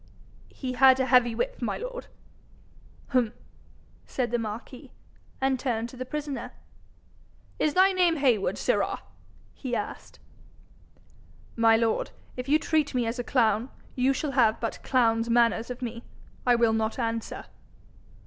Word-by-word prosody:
'He 255 -2 -5
had 260 0 +6
a 260 - +2
heavy 245 -2 +4
whip, - - -3
my - - -1
lord.' - - -6 1.1
'H'm!' 245 -3 +2 0.7
said 245 -3 -2
the 240 - +1
marquis, 235 +5 -7 0.5
and 265 -1 +1
turned 235 -3 -2
to 255 - -12
the 255 0 -6
prisoner. 295 -1 -5 1.1
'Is 305 - +1
thy 380 +1 +6
name 360 -3 +3
Heywood, 250 -9 +1
sirrah?' - - 0 0.5
he 255 -3 -4
asked. - - -6 1.4
'My 225 -1 +5
lord, 225 -1 0 0.3
if 250 +1 -6
you 300 - +6
treat 310 -3 0
me 245 -2 +1
as 230 +2 -3
a - - -1
clown, 230 -2 +1 0.3
you 255 +1 +3
shall 275 +2 -2
have 230 -5 +3
but 230 - -4
clown's 230 -3 +2
manners 235 -1 +3
of 250 +1 -6
me; 235 0 -5 0.4
I 245 - +6
will 235 -1 +3
not 220 0 -1
answer.' 230 -2 -3
250 Hz, 145 wpm, -27 LUFS, 230-270 Hz, 1.4 s, had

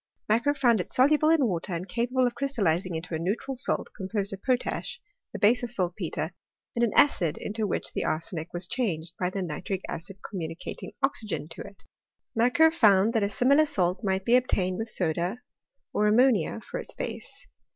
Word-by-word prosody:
Macquer 235 +7 +2
found 240 -6 +3
it - - -6
soluble 300 +4 +4
in 320 -4 +4
water 180 -3 -1
and 175 +3 -5
capable 245 +5 +1
of 245 - 0
crystallizing 190 - 0
into 165 +2 -5
a 160 - -1
neutral 205 +10 -2
salt 255 - -1
composed 200 0 -3
of 195 - -7
potash 255 -1 -1 0.3
(the - - -5
base 230 +4 +4
of 240 -2 -4
saltpetre), 175 -5 -2 0.4
and 240 - +1
an 235 - +2
acid 170 - +4
into 215 0 -3
which - - -2
the - - -1
arsenic 165 0 -3
was 175 +1 -4
changed 175 -9 -2
by 180 - +1
the 190 0 -3
nitric 180 +3 -4
acid 185 +4 -6
com^ 195 - -6
municating 165 +2 -7
oxygen 215 - -1
to 165 - -8
it. 200 -1 -11 0.5
Macquer 250 +8 +5
found 210 - +5
that 225 - +2
a 200 - +1
similar 280 +8 +4
salt 185 -3 0
might 190 -1 0
be 240 - +5
obtained 190 -7 +1
with 225 0 -3
soda 175 +3 -1 0.6
or 210 - +2
ammonia 225 -3 +3
for - - -6
its - - -5
base. - - -6
205 Hz, 185 wpm, -27 LUFS, 180-245 Hz, 0.6 s, Macquer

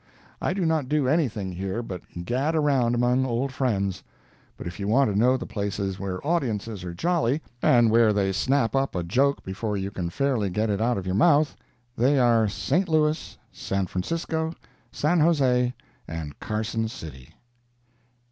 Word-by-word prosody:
I - - 0
do 190 -3 0
not 160 -5 0
do 150 -3 +1
anything 125 - 0
here 95 +5 -3
but 90 -6 -6 0.2
gad 135 - 0
around 135 -6 +2
among 125 +2 +2
old 130 +2 -1
friends. 100 -8 -1 0.6
But - - -8
if 85 +3 -6
you 100 - -3
want 115 0 +3
to - - -4
know 125 +5 +4
the 120 - -6
places 100 -2 -3
where 95 +3 -4
audiences 115 - -1
are 85 -1 -6
jolly, 160 - +1 0.2
and 120 -3 +5
where 115 -1 +5
they 100 -2 +1
snap 130 +5 +1
up 135 -4 0
a 90 - -1
joke 135 +11 +1
before 105 +2 -3
you 95 +1 -3
can 90 -3 -3
fairly 120 -1 0
get 105 +4 0
it 100 +1 -1
out 120 0 +1
of 95 - -4
your 90 - -1
mouth, 145 - +4 0.4
they 130 +5 +3
are 115 -3 +4
St. 100 - 0
Louis, 155 0 +1
San 95 0 -2
Francisco, 160 - -2 0.4
San 165 +4 +1
Jose 130 -6 +3 0.4
and 80 -3 -6
Carson 110 +1 -2
City. 80 - -10
115 Hz, 170 wpm, -25 LUFS, 100-140 Hz, 0.6 s, and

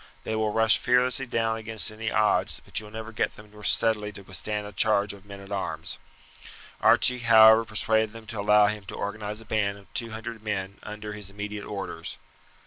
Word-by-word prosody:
They 110 - -2
will 110 -1 0
rush 110 0 +4
fearlessly 125 +2 +2
down 115 -1 0
against 110 -1 +1
any 110 +1 -4
odds, 110 -1 +1
but - - -1
you 105 - -9
will 105 - -14
never 110 0 -6
get 115 - -1
them 105 0 -15
steadily 105 -2 +1
to 100 - -10
withstand 105 +2 -4
a 105 - -8
charge 100 0 +2
of 100 0 -15
men 100 -1 -9
at 100 0 -12
arms." 100 -1 -4 0.8
Archie, 125 0 +5
however, 110 -1 +7
persuaded 110 0 +1
them 115 0 -11
to 110 -1 -5
allow 105 +1 +5
him 105 0 -1
to - - -7
organize 105 +1 -4
a - - -14
band 100 -2 0
of 100 - -19
two 115 -2 -2
hundred 110 0 -7
men 100 -2 -4
under 105 0 -7
his 105 -2 -8
immediate 105 +1 -6
orders. 95 -5 -5
105 Hz, 200 wpm, -26 LUFS, 105-110 Hz, 0.8 s, however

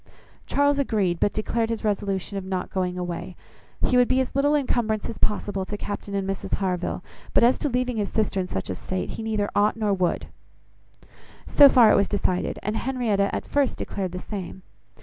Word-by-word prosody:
Charles 285 0 +2
agreed, 200 -10 +1
but 205 - +2
declared 225 +2 -1
his 230 -1 -3
resolution 200 -2 -1
of 195 - -3
not 185 -1 -3
going 180 -1 -1
away. 175 0 -5 0.5
He 250 - +2
would 245 -1 +5
be 260 - +2
as 260 - -1
little 285 +2 +3
incumbrance 235 -6 0
as 230 - -7
possible 205 -2 -1
to 205 - -5
Captain 205 0 -5
and 195 -1 -1
Mrs 195 -1 -2
Harville; 185 -2 -2 0.3
but - - +5
as 245 +2 +5
to 295 - 0
leaving 250 -1 -1
his 205 -2 -1
sister 210 -3 0
in 185 - -1
such 95 - -4
a - - -1
state, 185 - -4
he - - -6
neither 215 -2 -1
ought, 210 +2 +2
nor 210 -2 +1
would. 180 -3 0 1.2
So 285 -1 +7
far 235 -5 +6
it - - +5
was 200 - +3
decided; 185 -3 -1
and 215 +2 -1
Henrietta 230 -6 0
at - - -3
first 285 -3 0
declared 190 -3 -4
the 180 - -5
same. 190 -1 -7
205 Hz, 200 wpm, -25 LUFS, 190-235 Hz, 1.2 s, So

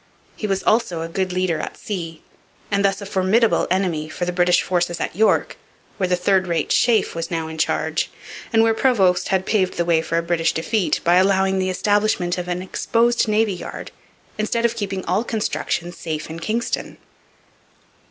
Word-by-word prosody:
He 215 - -4
was 195 -1 -1
also 215 -7 +1
a 165 - -3
good 185 +2 -2
leader 180 -3 0
at - - -6
sea 170 -6 -6 0.5
and 200 0 +2
thus 195 0 +1
a - - -6
formidable 200 +4 +2
enemy 175 -5 0
for 175 - -3
the 180 - -1
British 175 0 +3
forces 175 -1 -1
at - - -3
York, 220 +3 +2 0.4
where 185 -2 0
the 180 - +3
third 185 +1 +1
rate 170 -3 -1
Sheaffe 230 -4 +3
was 165 0 -4
now 165 -2 -2
in 160 0 -8
charge, - - 0 0.4
and 225 -1 +4
where 225 0 +3
Prevost 190 -8 +2
had 190 -1 0
paved 190 -4 0
the 170 - +1
way 165 -1 +3
for 165 +1 -2
a 170 - +1
British 165 -1 +1
defeat 190 +4 0
by 175 +1 +4
allowing 190 0 +3
the 185 0 0
establishment 205 -2 +1
of 180 - -5
an 180 +1 -2
exposed 235 +5 +1
navy 215 -1 +2
yard 180 - -7 0.5
instead 230 +2 0
of 235 0 +1
keeping 195 -4 -4
all 190 +5 +1
construction 210 -6 -2
safe 160 -2 -5
in 165 - -6
Kingston. 225 +7 -3
185 Hz, 185 wpm, -21 LUFS, 175-210 Hz, 0.5 s, and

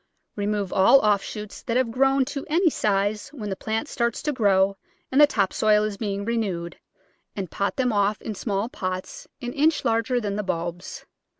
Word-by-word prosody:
Remove 205 -2 -2
all 215 +8 +6
offshoots 210 0 -1
that 235 0 -1
have 255 -3 +1
grown 270 +2 +3
to 280 0 -5
any 335 +2 +3
size 205 -1 0
when 215 -8 -5
the - - -1
plant 220 +8 -3
starts 235 -4 -2
to 300 - 0
grow 195 -5 +3 0.4
and 270 +3 +5
the 295 - +9
top 200 -9 0
soil 210 -1 +3
is 215 -1 -2
being 200 -1 -3
renewed, 195 -7 -2 0.6
and 190 -5 -5
pot 200 0 -1
them 250 -4 +1
off 205 +1 +1
in 220 - -5
small 200 0 -2
pots 185 - -5 0.2
an 245 - -4
inch 305 +2 +2
larger 230 +2 +1
than 205 -3 -3
the 210 - -1
bulbs. 175 -1 -4
210 Hz, 185 wpm, -24 LUFS, 200-250 Hz, 0.6 s, the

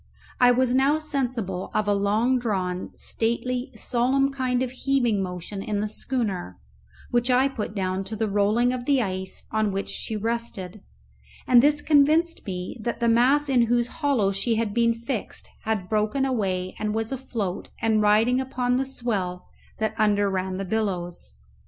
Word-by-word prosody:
I 245 - +7
was 245 0 +3
now 270 +4 +4
sensible 245 -11 -3
of 215 -1 +1
a 205 - +3
long 215 +6 +2
drawn, 185 -6 -2
stately, 245 +2 -2
solemn 265 +3 +1
kind 255 -2 0
of 250 - -3
heaving 255 -5 +1
motion 180 +2 -5
in 205 0 -2
the 210 - -1
schooner, 205 - -3 0.5
which 240 +1 +1
I 255 +2 +4
put 220 -5 -5
down 190 -1 -1
to 220 - -5
the 220 +1 -1
rolling 210 +5 +2
of 245 -1 -4
the 280 -1 +3
ice 190 -1 -5
on 215 -1 +1
which 195 0 -3
she 220 - -3
rested; 215 -4 -3 0.6
and 245 -1 +6
this 295 +2 +3
convinced 315 +2 +3
me 180 +1 -4
that 235 +2 -3
the 235 - +1
mass 255 +6 +4
in 245 -4 +3
whose 240 0 +2 0.2
hollow 260 -10 +2
she 200 +4 0
had 220 -2 -1
been 230 0 +3
fixed 235 0 -5 0.2
had 215 -4 -1
broken 215 +6 +1
away 190 -8 -1
and 215 0 -1
was 225 +1 -2
afloat 230 -8 -4
and 220 -1 +2
riding 220 +5 +4
upon 250 -1 0
the 265 - 0
swell 200 -9 -3 0.3
that 220 -1 -1
under 205 -2 +3
ran 185 0 -2
the 195 - -3
billows. 180 - -3
225 Hz, 170 wpm, -25 LUFS, 200-255 Hz, 0.6 s, I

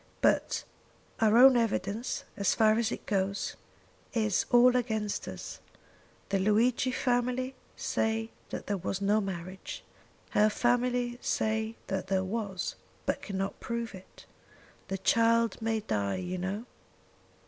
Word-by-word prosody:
But - - +2 0.6
our 220 0 +5
own 260 +1 +9
evidence 225 -1 -1
as 200 -2 +1
far 220 0 +4
as 230 -1 0
it - - -5
goes 200 -1 -1 0.6
is 215 -5 +1
all 245 +1 +6
against 220 -4 -1
us. - - -7 0.7
The 195 - +1
Luigi 225 +6 +3
family 250 +1 0 0.2
say 225 0 -1 0.2
that - - -5
there 205 - -1
was 185 +1 -3
no 205 +2 +2
marriage. 185 -1 -6 0.5
Her 210 +1 +4
family 245 +1 +1
say 220 +1 0
that 190 -1 -3
there 190 -1 +1
was, 195 -2 -3 0.3
but - - -1
cannot 195 -1 -3
prove 235 -1 -3
it. 190 -1 -13 0.6
The 195 - -2
child 230 +3 +3
may 225 -1 0
die, 100 - -1
you 185 0 -3
know." 195 +5 -3
220 Hz, 130 wpm, -30 LUFS, 195-235 Hz, 0.7 s, own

